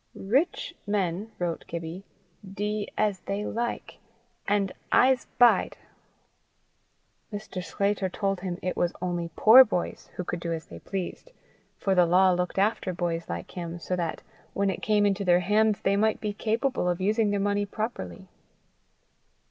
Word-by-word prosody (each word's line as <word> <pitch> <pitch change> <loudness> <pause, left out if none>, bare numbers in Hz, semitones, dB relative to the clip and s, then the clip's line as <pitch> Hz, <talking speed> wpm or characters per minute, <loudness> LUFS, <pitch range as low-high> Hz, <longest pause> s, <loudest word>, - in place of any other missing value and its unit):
"Writch 265 - 0
men," 200 +1 -1
wrote 175 -2 -2
Gibbie, 170 +2 -6 0.5
"dee 210 +1 -2
as 210 -3 +1
they 200 +3 -3
like, 235 +1 -4 0.5
and 200 -1 +1 0.2
Ise 255 -1 +4
bide." 245 -1 +4 1.5
Mr. 205 -3 -6
Sclater 200 0 -1
told 195 0 -1
him 180 -1 -4
it 185 - -1
was 175 - 0
only 175 -1 -2
poor 240 +5 +9
boys 195 -7 -3
who 180 - -3
could 175 0 -4
do 170 0 -4
as 165 -1 -3
they 85 - -11
pleased, 195 - -5 0.5
for 195 - 0
the 180 -2 +4
law 185 +2 +5
looked 180 +1 -1
after 195 -2 +1
boys 170 -1 -3
like 85 0 -5
him, 170 -1 -5
so 180 +1 -3
that, 170 -2 -3 0.3
when 200 0 +1
it 185 - -6
came 210 -1 +2
into 200 0 +1
their 180 -1 +4
hands, 210 +3 +2
they 195 - +2
might 215 +1 +2
be 210 -1 -3
capable 225 -1 0
of 175 0 -1
using 210 +3 +2
their 205 0 0
money 205 0 0
properly. 195 - -5
195 Hz, 155 wpm, -27 LUFS, 175-210 Hz, 1.5 s, poor